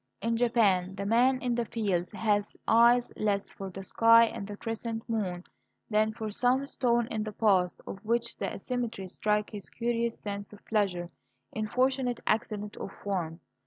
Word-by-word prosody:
In 230 +1 0
Japan 205 -6 +2
the 200 0 -4
man 245 +5 +4
in 245 -1 +1
the 235 0 0
fields 195 -6 -1
has 210 -1 0
eyes 235 +2 +5
less 200 -2 0
for 195 -1 -7
the 195 +1 -8
sky 230 +4 +6
and 220 -3 -5
the 205 -1 -7
crescent 225 0 -4
moon 190 -6 -2 0.5
than 215 +1 +3
for 220 -1 -5
some 250 +5 +2
stone 240 -4 +1
in 220 - -1
the 215 0 -3
path, 195 -4 +2
of 195 - -7
which 235 +1 0
the - - -2
asymmetry 235 -6 -4
strikes 210 +3 0
his 205 -3 -7
curious 235 0 -1
sense 200 -1 -5
of 205 - -15
pleasure 185 -5 0 0.4
in 215 0 -3
fortunate 255 +1 +1
accident 210 -1 -1
of - - -6
form. 175 -6 -4
215 Hz, 170 wpm, -29 LUFS, 200-235 Hz, 0.5 s, sky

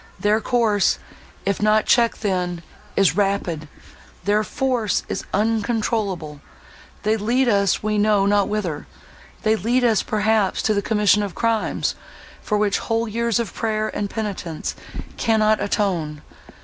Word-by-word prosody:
Their 210 +2 +2
course, 220 -4 +2 0.5
if 200 0 0
not 215 0 +3
checked 235 -2 +2
then, 180 -3 -1 0.3
is 195 -4 +3
rapid—their 195 +1 -2
force 245 -3 0
is - - -4
uncontrollable—they 210 -3 -2
lead 240 +5 +1
us 200 -4 +2
we 215 0 0
know 205 -1 +3
not 205 0 +3
whither—they 210 +3 -4
lead 240 +6 +1
us 225 -4 +3
perhaps 215 -2 +1
to 215 - +2
the 200 - +1
commission 210 -1 +3
of 200 -3 -4
crimes, 230 -2 0 0.5
for 210 - -1
which 205 -1 +1
whole 225 +1 -1
years 230 +1 0
of 230 -4 -3
prayer 215 -1 -2
and 205 - -2
penitence 195 -8 -4 0.4
cannot 215 -2 +2
atone! 170 -8 -1
210 Hz, 125 wpm, -22 LUFS, 195-220 Hz, 0.5 s, not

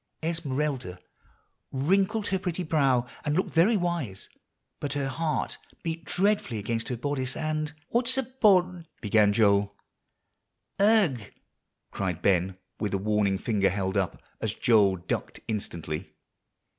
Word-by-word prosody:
"Esmeralda 145 - -2 0.7
wrinkled 195 +10 +1
her 190 0 +1
pretty 180 -1 -2
brow, 135 -6 +2 0.2
and 150 0 0
looked 185 - 0
very 195 +7 +4
wise; 170 - -3 0.5
but 145 - -3
her 140 -2 -1
heart 155 +3 -2 0.2
beat 165 -1 -4
dreadfully 195 - +1
against 115 +2 -2
her 125 - -3
bodice 130 0 -2
and" 155 -1 -2 0.2
"What's 245 +2 +2
a 265 - +2
bod" 185 -9 +2
began 105 -1 +4
Joel. 100 -1 +3 1.0
"Ugh!" 200 - +4 0.7
cried 90 -3 -3
Ben 95 -1 +2 0.2
with 105 -2 -1
a - - +2
warning 100 -1 +1
finger 100 -1 +1
held 95 +1 -2
up, 95 -3 0 0.2
as - - -1
Joel 105 -5 +4
ducked 90 0 -4
instantly. 85 -5 -4
135 Hz, 130 wpm, -27 LUFS, -, 1.0 s, very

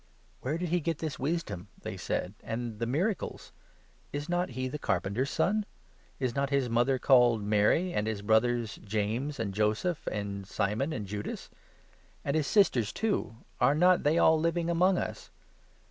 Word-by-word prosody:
"Where 145 +5 -2
did 175 0 -3
he 175 +2 +2
get 165 -1 -2
this 155 -2 -4
wisdom?" 140 - -2 0.2
they - - -4
said, 90 - -3
"and 115 -1 -4
the 115 - -1
miracles? 175 - -2 0.6
Is 145 +1 -4
not 175 +1 0
he 130 0 -1
the 150 +4 -5
carpenter's 100 +5 0
son? 215 +2 +1 0.6
Is 130 -3 -1
not 140 +1 0
his 135 -4 +1
mother 120 +3 +3
55 130 - -8
called 120 -5 +5
Mary, 105 - +2
and 105 - 0
his 105 -2 -3
brothers 115 +1 +2
James, 110 +7 -2
and 100 -3 -2
Joseph, 110 - 0
and 100 -2 -4
Simon, 110 +9 -1
and 110 -9 -3
Judas? 105 +1 -6 0.7
And 140 - 0
his 155 -3 +1
sisters, 130 - +3
too 210 - -1
— - - -29
are 140 - +5
not 180 +3 +5
they 150 +2 +2
all 160 -1 +5
living 170 +1 0
56 - - +2
among 180 +2 +3
us 110 -7 -4
130 Hz, 175 wpm, -30 LUFS, 110-160 Hz, 0.7 s, called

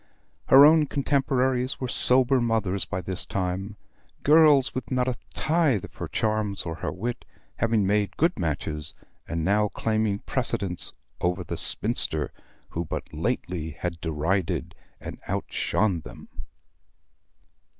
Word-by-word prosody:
Her 135 +2 +9
own 155 0 +5
contemporaries 130 -2 0
were 130 - -2
sober 130 +1 +4
mothers 110 -5 0
by 95 -2 -4
this 90 +1 -2
time; 95 +2 -3 0.5
girls 150 -3 +5
with 130 - -5
not 125 -1 0
a 130 - 0 0.2
tithe 155 - +1
of - - -15
her - - -4
charms, 110 -2 -1
or 80 - -4
her 80 - -4
wit, 120 +5 -4 0.3
having 110 -3 +1
made 105 +1 0
good 165 -3 +1
matches, 75 -2 -3 0.3
and 85 -1 -2
now 105 +2 +3
claiming 110 -1 -1
precedence 100 -7 -1 0.3
over 90 +1 -1
the - - -5
spinster 75 -1 0 0.4
who 85 - -3
but 80 - -6
lately 80 -4 -3
had 85 -2 -4
derided 80 +3 -1 0.3
and - - -9
outshone 100 -5 0
them. 65 -6 -12
105 Hz, 130 wpm, -26 LUFS, 90-130 Hz, 0.5 s, Her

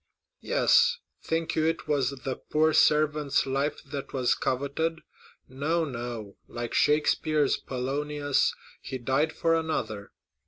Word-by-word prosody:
"Yes; - - +3 0.2
think 165 0 -2
you 160 0 +2
it 165 -1 -2
was 140 -4 +1
the 135 -1 -5
poor 155 +1 +1
servant's 150 -2 +3
life 140 +2 -1 0.3
was 130 -3 +2
coveted? 140 +5 -2 0.5
No, 155 +6 -1
no; 120 -6 -6
like 120 0 -5
Shakespeare's 150 0 +2
Polonius, 145 +2 -1 0.3
he 130 - -5
died 135 +6 +1
for 165 - +1
another. 120 -11 -2
145 Hz, 115 wpm, -27 LUFS, 130-155 Hz, 0.5 s, Yes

